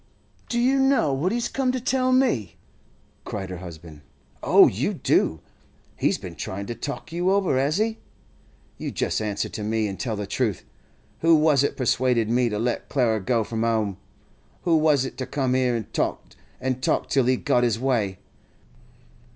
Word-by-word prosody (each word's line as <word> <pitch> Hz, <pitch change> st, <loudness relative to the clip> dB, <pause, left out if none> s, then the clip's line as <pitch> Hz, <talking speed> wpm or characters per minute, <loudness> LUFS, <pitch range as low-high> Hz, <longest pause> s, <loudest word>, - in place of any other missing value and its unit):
'Do 240 Hz, -, -1 dB
you 260 Hz, +3 st, +3 dB
know 270 Hz, -, +3 dB
what 155 Hz, +8 st, 0 dB
he's 235 Hz, +1 st, -1 dB
come 265 Hz, -2 st, 0 dB
to 255 Hz, -, -2 dB
tell 255 Hz, +1 st, +1 dB
me?' 245 Hz, -, +1 dB, 0.7 s
cried 95 Hz, -3 st, -5 dB
her 90 Hz, -, -6 dB
husband. 80 Hz, -4 st, -10 dB, 0.4 s
'Oh, -, -, +7 dB
you -, -, -1 dB
do! 80 Hz, -1 st, +1 dB, 0.5 s
He's -, -, +1 dB
been -, -, -8 dB
tryin' 100 Hz, +1 st, -5 dB
to 120 Hz, -, -4 dB
talk 145 Hz, +6 st, -6 dB
you 175 Hz, +2 st, 0 dB
over, 195 Hz, -6 st, +2 dB
has 145 Hz, +5 st, +1 dB
he? 220 Hz, +1 st, 0 dB, 0.8 s
You -, -, -3 dB
just -, -, -1 dB
answer 105 Hz, -2 st, -2 dB
to -, -, -6 dB
me, 110 Hz, 0 st, 0 dB
an' 95 Hz, -1 st, -5 dB
tell 115 Hz, -4 st, -3 dB
the 105 Hz, 0 st, -4 dB
truth. 105 Hz, -1 st, -1 dB, 0.6 s
Who 165 Hz, 0 st, +5 dB
was 150 Hz, -3 st, +4 dB
it 145 Hz, -, -1 dB
persuaded 125 Hz, -3 st, +1 dB
me 120 Hz, 0 st, +2 dB
to 105 Hz, -, -3 dB
let 120 Hz, +3 st, -2 dB
Clara 115 Hz, -5 st, +1 dB
go 115 Hz, +4 st, 0 dB
from 115 Hz, +1 st, -3 dB
'ome? 110 Hz, -4 st, 0 dB, 0.7 s
Who 170 Hz, -2 st, +3 dB
was 155 Hz, -4 st, +3 dB
it -, -, -7 dB
come 135 Hz, -3 st, 0 dB
here 130 Hz, -2 st, +2 dB
an' 115 Hz, -3 st, -3 dB
talked -, -, -2 dB, 0.2 s
an' 130 Hz, 0 st, -2 dB
talked -, -, 0 dB
till 135 Hz, -3 st, +3 dB
he 130 Hz, +1 st, +2 dB
got 120 Hz, -, +1 dB
his 115 Hz, -2 st, +1 dB
way? 115 Hz, -8 st, 0 dB
125 Hz, 180 wpm, -24 LUFS, 110-160 Hz, 0.8 s, Oh